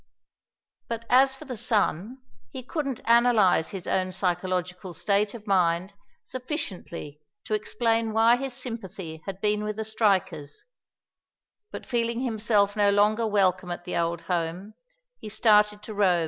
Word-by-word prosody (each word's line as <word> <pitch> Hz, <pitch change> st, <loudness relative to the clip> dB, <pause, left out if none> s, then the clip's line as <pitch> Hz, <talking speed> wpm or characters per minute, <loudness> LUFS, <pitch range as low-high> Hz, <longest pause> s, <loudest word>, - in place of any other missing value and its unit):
But 230 Hz, 0 st, -5 dB
as 265 Hz, +1 st, +5 dB
for -, -, -12 dB
the 255 Hz, -, -5 dB
son, 220 Hz, -, -1 dB, 0.3 s
he 255 Hz, -, -8 dB
couldn't 275 Hz, -3 st, -3 dB
analyze 230 Hz, -8 st, +4 dB
his 190 Hz, -2 st, -7 dB
own 185 Hz, -1 st, 0 dB
psychological 180 Hz, 0 st, -2 dB
state 205 Hz, +2 st, +1 dB
of 220 Hz, -2 st, -10 dB
mind 185 Hz, -1 st, +1 dB, 0.3 s
sufficiently 190 Hz, -, -6 dB, 0.2 s
to -, -, -3 dB
explain 225 Hz, +1 st, 0 dB
why 225 Hz, +2 st, +4 dB
his 270 Hz, 0 st, -4 dB
sympathy 195 Hz, -10 st, -7 dB
had 195 Hz, -1 st, -5 dB
been 210 Hz, 0 st, +1 dB
with 210 Hz, 0 st, -3 dB
the 220 Hz, +1 st, -4 dB
strikers, 195 Hz, -9 st, 0 dB, 1.1 s
but -, -, -8 dB
feeling 235 Hz, 0 st, -1 dB
himself 215 Hz, -4 st, +1 dB
no 205 Hz, -1 st, +3 dB
longer 210 Hz, +3 st, +3 dB
welcome 185 Hz, -3 st, +1 dB
at 175 Hz, 0 st, -6 dB
the 180 Hz, -, -4 dB
old 170 Hz, 0 st, -1 dB
home, 180 Hz, +4 st, -3 dB, 0.5 s
he 215 Hz, -, -8 dB
started 210 Hz, -1 st, +3 dB
to 215 Hz, -, -7 dB
roam. 190 Hz, -4 st, +3 dB
210 Hz, 145 wpm, -26 LUFS, 185-230 Hz, 1.1 s, as